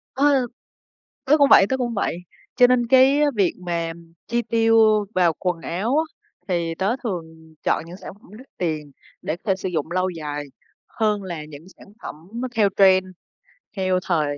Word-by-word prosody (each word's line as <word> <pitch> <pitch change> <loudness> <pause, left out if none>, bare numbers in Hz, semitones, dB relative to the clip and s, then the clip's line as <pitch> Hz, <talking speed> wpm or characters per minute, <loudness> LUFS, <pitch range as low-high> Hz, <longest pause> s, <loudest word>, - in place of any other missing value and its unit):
Ừ, 275 -2 +3 0.8
tớ 285 +3 +4
cũng 285 -1 +5
vậy, 195 - +8
tớ 265 - 0
cũng 240 -2 -2
vậy. 200 - -1 0.4
Cho 245 - +7
nên 245 -1 +2
cái 265 +3 +5 0.2
việc 195 -4 +2
mà, 170 -1 -1
ừm, 165 0 -11 0.2
chi 235 +1 0
tiêu 225 -2 +3
vào 175 -2 +3
quần 180 -3 -2
áo 210 - -2
á, 320 - +2 0.4
thì 170 -2 -1
tớ 195 +8 -1
thường 160 -7 -7
chọn - - 0
những 175 +2 -10
sản 190 - -10
phẩm 200 -2 -21
đắt 260 - -14
tiền 155 -5 -3 0.3
để 155 - -3
có - - -35
thể 195 -2 +2
sử 190 - -4
dụng 160 -3 -3
lâu 185 +1 0
dài 150 -3 -5 0.4
hơn 210 -2 -1
là 170 -5 -6
những 150 +2 -12
sản - - -15 0.2
phẩm - - -6 0.2
nó 255 +2 -3
theo 215 -3 +3
trend, 190 -1 +5 0.7
theo 185 -1 +1
thời 150 -5 0
190 Hz, 190 wpm, -22 LUFS, 165-230 Hz, 0.8 s, vậy